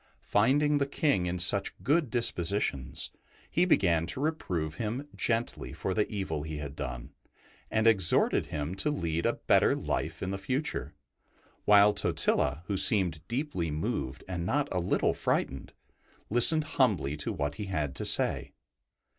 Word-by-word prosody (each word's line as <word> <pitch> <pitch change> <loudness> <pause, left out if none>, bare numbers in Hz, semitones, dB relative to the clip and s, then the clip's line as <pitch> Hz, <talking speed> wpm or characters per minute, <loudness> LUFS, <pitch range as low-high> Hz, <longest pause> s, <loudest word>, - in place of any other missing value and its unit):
Finding 145 +7 +2
the 140 - 0
King 140 - 0
in 90 +1 -2
such 95 +3 +3
good 150 0 +2
dispositions, 90 - +1 0.4
he 175 - +3
began 85 - +2
to 85 - -2
reprove 90 - -2
him 120 +6 -4
gently 115 0 -2
for 95 - -3
the 105 +2 0
evil 95 -8 -3
he 80 0 -6
had 70 -1 -7
done, 65 -3 -6 0.6
and 110 0 0
exhorted 95 -6 +3
him 75 +2 -4
to 95 +10 0
lead 85 - -1
a - - +1
better - - +2
life 85 +3 -3
in 95 - -2
the 100 - -4
future, 130 +9 -3 0.7
while 105 0 +6
Totila, 70 -4 +1
who 100 +2 -2
seemed 95 -5 +3
deeply 120 - -2
moved 75 -3 -3
and 90 -2 -4
not 140 +10 0
a 90 - 0
little 90 - +1
frightened, 65 -1 -2 0.6
listened 155 +7 +4
humbly 100 - 0
to 75 - -2
what 70 0 -3
he - - -3
had 75 -8 -2
to - - -4
say. - - +1
95 Hz, 155 wpm, -29 LUFS, 80-120 Hz, 0.7 s, while